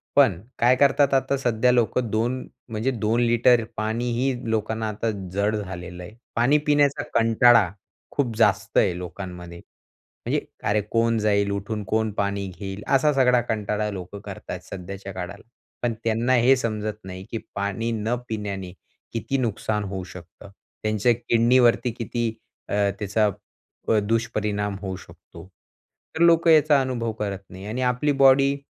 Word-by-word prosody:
पण, 130 -12 +5 0.2
काय 125 +2 +5
करतात, 140 +1 +3
आता 135 +1 +2
सध्या 125 -1 +2
लोक, 120 -1 +1
2, 120 +2 -1 0.2
म्हणजे 115 +4 -1
2 115 0 0
लिटर 120 0 +4
पाणीही 120 +4 0 0.2
लोकांना 110 0 -1
आता 110 +2 -2 0.2
जड 100 +2 +1
झालेलं 90 -3 -6
आहे. 90 - -10 0.2
पाणी 125 +6 +4
पिण्याचा 145 -1 +3
कंटाळा, 115 -3 +5 0.4
खूप 120 -6 -1
जास्त 105 -1 +2
आहे 90 -3 +3
लोकांमध्ये. 90 -1 -8 0.7
म्हणजे, - - +1 0.2
"अरे, 105 +1 +2
कोण 115 0 +2
जाईल 100 -1 +2
उठून, 100 +1 -3
कोण 110 +2 0
पाणी 100 0 -1
घेईल," 100 0 -6
असा 140 +2 +3
सगळा 125 -2 +4
कंटाळा 105 -1 -1
लोकं 100 +1 -7
करतात - - -7
सध्याच्या 95 +1 -7
काळाला. 95 +2 -7 0.4
पण 120 - +1
त्यांना 115 +3 +1
हे 125 +2 +5
समजत 110 -2 -3
नाही, 95 0 -8
की 115 - -2 0.2
पाणी 100 +3 -2
न 115 +2 -1
पिण्याने 100 -4 -4 0.4
किती 125 +4 -1
नुकसान 110 -3 -1
होऊ 95 -1 -5
शकतं, 90 +1 -12 0.3
त्यांच्या 110 +2 +2
किडनीवरती 120 +1 +3
किती 120 0 -3 0.4
अ, - - -1 0.2
त्याचा 105 +1 +1 0.6
प - - +3
दुष्परिणाम 105 -3 -1
होऊ 95 -2 -4
शकतो. - - -14 0.7
तर 160 - -2
लोकं 170 0 +5
याचा 150 -2 +5
अनुभव 120 -3 -2
करत 100 -2 -2
नाही. 95 +1 -10
आणि 115 +4 -3
आपली 125 +3 +1
बॉडी 135 +1 +6
110 Hz, 145 wpm, -24 LUFS, 100-125 Hz, 0.7 s, बॉडी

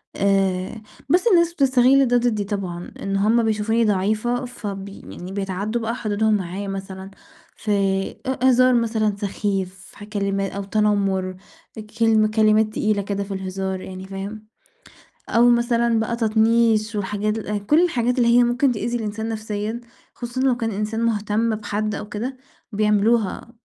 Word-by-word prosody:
آآ، 195 +1 0 0.3
بس 365 +9 +3
الناس 340 -4 +4
بتستغل 265 -1 +4
ده 245 0 +3
ضدي 230 -4 0
طبعًا، 190 -4 -5
إن 195 0 -2
هم 220 +4 +3
بيشوفوني 220 +1 +1
ضعيفة 215 +5 0
فب 200 -5 -6
يعني 185 -1 -10
بيتعدّوا 200 +4 -3
بقى 230 +2 -2
حدودهم 215 -1 0
معايا، 195 +1 -4
مثلًا 195 0 -6 0.4
في 215 - -4 0.5
أ 260 0 -1
هزار 255 0 +5
مثلًا 220 -3 +1
سخيف، 195 -2 -2 0.2
في - - -19
ح 205 - -10
كلما 200 -2 -2
أو 200 - -4
تنمُّر، 195 -2 0 0.6
كلمة 220 -1 +4
كلمات 215 0 +3
تقيلة 215 -1 0
كده 200 0 -3
في 200 0 -6
الهزار 190 0 -4
يعني 185 0 -8
فاهم، 200 +3 -7 0.8
أو 240 +1 +5
مثلًا 235 -1 +2
بقى 225 +1 -1
تطنيش 225 -1 +2
والحاجات 205 +2 -1 0.3
كُلّ 305 +7 +5
الحاجات 250 -6 0
اللي 235 - +4
هي 245 - +6
ممكن 245 +2 +2
تؤذي 240 +2 -2
الإنسان 220 0 -4
نفسيًا، 215 +1 -4 0.3
خصوصًا 245 +1 -5
لو 260 -2 +3
كان 225 -2 -2
إنسان 215 +2 -3
مهتم 220 0 0
بحد 215 0 -3
أو 210 - -6
كده 245 +6 -4 0.4
بيعملوها 210 +1 +1
215 Hz, 145 wpm, -22 LUFS, 200-235 Hz, 0.8 s, هي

